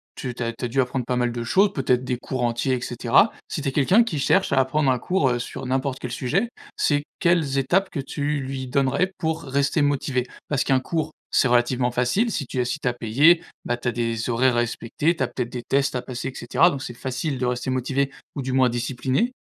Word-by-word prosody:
tu 125 -2 -5
tu 120 - -9
as 115 0 -2
tu 125 +1 -5
as - - 0
dû 130 +3 +1
apprendre 125 0 -2
pas 125 0 -1
mal 120 -1 +1
de 120 0 -4
choses, 195 - +3
peut-être 130 -2 +1
des 125 -1 -2
cours 130 +1 -4
entiers 120 +2 0
et 125 - -4
cetera. 120 - +3 0.2
Si 155 - -4
tu 140 - -1
es - - -4
quelqu'un 185 - +4
qui 185 -10 -3
cherche 165 +3 +2
à 135 - +4
apprendre 135 +2 +2
un 125 - +1
cours, 170 0 +1
heu, 120 -1 0
sur 120 - -6
n'importe 130 0 -1
quel 125 - -5
sujet, 195 - 0 0.3
c'est 145 -1 +2 0.2
quelles 160 -6 +2
étapes 185 +9 +1
que 145 - -4
tu 145 +2 -2
lui 130 -1 -4
donnerais 140 +7 +1
pour 160 0 -1
rester 140 +2 +1
motivé? 135 -3 0 0.2
Parce 145 -2 +1
qu'un 135 -2 +2
cours, 155 +3 -3 0.2
c'est - - +3
relativement 125 +1 +2
facile, 125 - +1
si 140 -9 -3
tu 130 - -3
es 125 - +2
si 125 +5 -2
tu 130 - -3
as 120 - +2
payé, 140 +9 +4 0.2
bah, 120 0 -1
tu 120 - -2
as - - 0
des 115 0 -2
horaires 125 +1 +3
à 120 - +3
respecter, 120 +7 0
tu - - -8
as - - +2
peut-être 120 -2 -4
des 125 - -4
tests 140 +2 +1
à 125 - -1
passer 125 +1 -5
et - - -10
cetera, 140 +9 +3
donc 135 - -5
c'est 120 - -6
facile 130 +3 -3
de 125 - -1
rester 125 +1 -2
motivé 135 +2 0 0.3
ou 140 - -3
du 130 0 -3
moins 130 -1 +4
discipliné. 130 - -1
130 Hz, 250 wpm, -23 LUFS, 125-145 Hz, 0.3 s, quelqu'un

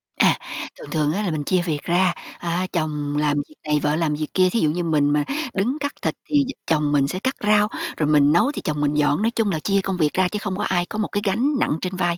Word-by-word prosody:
À, - - +4 0.4
thường - - -10
thường 150 -1 +1
á, 205 +4 -1
là 190 - -1
mình 155 -2 -2
chia 180 +4 +1
việc 150 -4 -2
ra, 180 +1 +2 0.3
a, 175 +2 -1
chồng 150 -3 -2
làm 150 -1 +1
việc 155 - -18
này 150 0 +2
vợ 150 +1 +1
làm 160 -2 0
việc 155 0 -3
kia, 185 -1 +4
thí 230 - 0
dụ 155 - +2
như 175 +3 -1
mình 150 -3 +2
mà 150 0 +2 0.3
đứng 235 +9 0
cắt 285 0 -2
thịt - - 0 0.2
thì 290 -1 +4
d - - -3 0.2
chồng 150 -2 +1
mình 140 -2 +3
sẽ 185 +6 -3
cắt 260 +6 -1
rau, 210 0 +4 0.3
rồi 150 -2 +1
mình 145 -1 +5
nấu 175 - +3
thì - - -6
chồng 150 -1 -2
mình 145 0 +1
dọn. 150 +2 +2
Nói 225 +2 +2
chung 225 -3 0
là 160 - -1
chia 195 +4 +1
công 190 -1 -3
việc 155 -4 +1
ra 185 0 +2
chứ 210 +3 -4
không 205 -3 -3
có 205 - -2
ai 175 -2 +1
có 210 - -7
một 210 - 0
cái 205 - -1
gánh 210 +7 +1
nặng - - +1
trên 185 0 -3
vai, 175 -2 0
175 Hz, 285 wpm, -22 LUFS, 150-195 Hz, 0.4 s, mình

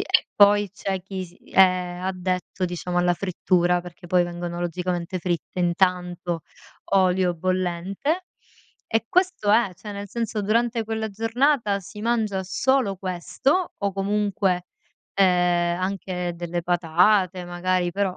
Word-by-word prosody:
E - - +2
poi 205 -1 +5
c'è 195 -2 -4
chi 190 -1 -5
s 175 0 -15 0.2
è - - -1 0.4
addetto, 185 0 -2
diciamo, 175 0 -2
alla 175 0 +3
frittura, 180 -1 +1
perché 175 0 -12
poi 180 0 +3
vengono, 175 0 -4
logicamente, 175 +1 -2
fritte 175 +1 -3
in 175 -1 +2
tanto 180 -2 0 0.5
olio 185 -2 +3
bollente 185 - -1 0.6
e 225 0 0
questo 365 - +2
è, 210 -3 +4
cioè, 210 +4 -9
nel 200 0 -6
senso, 225 -1 -2
durante 230 +2 +1
quella 220 0 -2
giornata 225 0 +1
si 200 +2 -10
mangia 215 -5 0
solo 215 +2 +1
questo 190 - -1
o 200 -1 -1
comunque, 195 -2 0 0.5
ehm, 180 -2 +3
anche 185 -2 -2
delle 175 0 -3
patate, 180 +2 +2
magari, 175 0 0
però 195 -1 -1
185 Hz, 130 wpm, -24 LUFS, 175-205 Hz, 0.6 s, poi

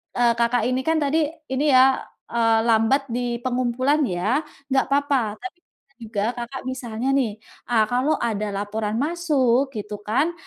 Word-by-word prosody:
eee, 240 -1 +4
Kakak 235 0 +2
ini 260 +3 -2
kan 320 -1 +2
tadi, 300 +2 +1 0.2
ini 270 +3 +1
ya, 260 +1 +6 0.3
eee, 225 -1 +3
lambat 235 +4 +2
di 240 0 -2
pengumpulan 255 +3 +1
ya? 195 +9 0 0.3
Enggak 265 0 +2
apa-apa. 275 -6 +1
Tapi 360 +6 -9
bisa - - -45
juga 215 -2 -3
Kakak 240 +2 -6
misalnya 250 -2 -4
nih, 255 -6 +1 0.4
eee, 225 -3 +4
kalau 260 +5 +2
ada 215 -3 -1
laporan 210 +1 -3
masuk 280 -4 +1
gitu 210 -1 -5
kan, 275 +10 +1
245 Hz, 155 wpm, -23 LUFS, 225-275 Hz, 0.4 s, ya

